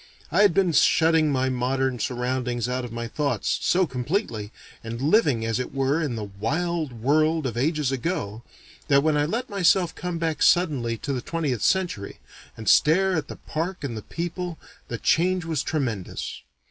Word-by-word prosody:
I 180 +6 +4
had 205 -6 +5
been 190 -3 +3
shutting 160 0 +4
my 130 -1 +1
modern 130 0 0
surroundings 125 0 -1
out 125 0 -2
of 120 - -6
my 120 0 -4
thoughts, 140 -3 -1
so 185 +1 +3
completely, 125 - -3 0.3
and 115 +1 -5
living 145 - +3
as 115 0 -1
it 125 - -4
were 135 +4 +1
in 145 -7 -2
the 110 - -4
wild 150 - -2
world 155 +6 +1
of 120 -4 -2
ages 150 +2 0
ago, 130 - -3 0.5
that 140 -1 +4
when 155 -1 +2
I 145 0 +2
let 230 +10 -2
myself 185 -4 +2
come 180 -1 -4
back 165 -1 -2
suddenly 135 -10 +3
to 140 +5 -3
the 125 - -2
twentieth 150 -8 -2
century, 175 - 0 0.4
and 110 - -8
stare 190 +5 +4
at 160 - -2
the - - -7
park 165 +2 -4
and 125 -5 -3
the 110 - -5
people, 175 - -5 0.3
the 115 - -4
change 180 +6 +2
was 160 -4 -1
tremendous. 120 - -3
145 Hz, 175 wpm, -25 LUFS, 120-165 Hz, 0.5 s, had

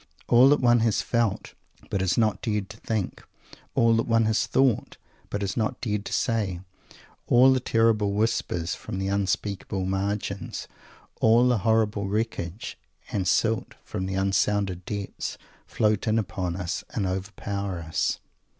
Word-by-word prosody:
All 125 +3 +7
that 145 - +4
one 120 -1 +5
has 115 -2 +1
felt, 115 -4 -1 0.4
but 95 - 0
has 95 -1 +1
not 110 -3 +2
dared 105 -4 -2
to 105 - -12
think; 110 -4 -3 0.5
all 115 -1 +4
that 115 - 0
one 115 -1 +3
has 110 0 +1
thought, 130 0 +1 0.3
but 105 - -3
has 100 -1 -2
not 110 -2 -1
dared 105 -4 -2
to - - -6
say; 100 -7 0 0.7
all 130 +2 +6
the 130 - +2
terrible 115 -4 +2
whispers 100 -6 0
from - - -6
the 95 0 -1
unspeakable 100 0 -1
margins; 100 0 -3 0.5
all 115 +3 +5
the 125 -3 +2
horrible 105 -1 +1
wreckage 105 -2 -3 0.3
and 95 -3 -1
silt 110 +5 +1
from 95 - -4
the 95 - -3
unsounded 95 -1 0
depths, 100 -2 -4 0.3
float 105 +1 +1
in 110 +1 +3
upon 95 -4 -2
us 90 +1 -3
and 100 - -2
overpower 100 0 -3
us. 80 0 -1
105 Hz, 150 wpm, -26 LUFS, 95-115 Hz, 0.7 s, All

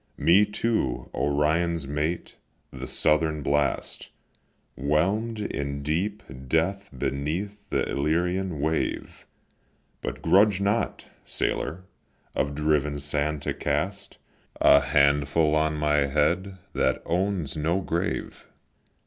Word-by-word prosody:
Me, 95 +5 +5
too, 105 - -1
Orion's 80 +2 +1
mate, 75 +4 -2 0.4
the - - -7
Southern 75 -1 +2
blast, 70 0 -1 0.7
Whelm'd 95 +11 0
in 70 -8 -3
deep 90 +8 -1 0.2
death 95 +8 0
beneath 90 +11 -3
the - - 0
Illyrian 85 +4 0
wave. 80 +3 -2 0.7
But - - -5
grudge 100 0 +5
not, 100 +4 0 0.2
sailor, 85 +6 -2 0.5
of 70 +1 -1
driven 75 -1 +1
sand 75 +1 -1
to - - -1
cast 80 +8 -2 0.4
A - - +7
handful 70 +2 +3
on 75 0 +2
my 75 -1 +2
head, 85 +7 0 0.2
that 65 - +1
owns 90 -3 -1
no 80 +4 0
grave. 85 -2 -3
80 Hz, 105 wpm, -26 LUFS, 75-95 Hz, 0.7 s, A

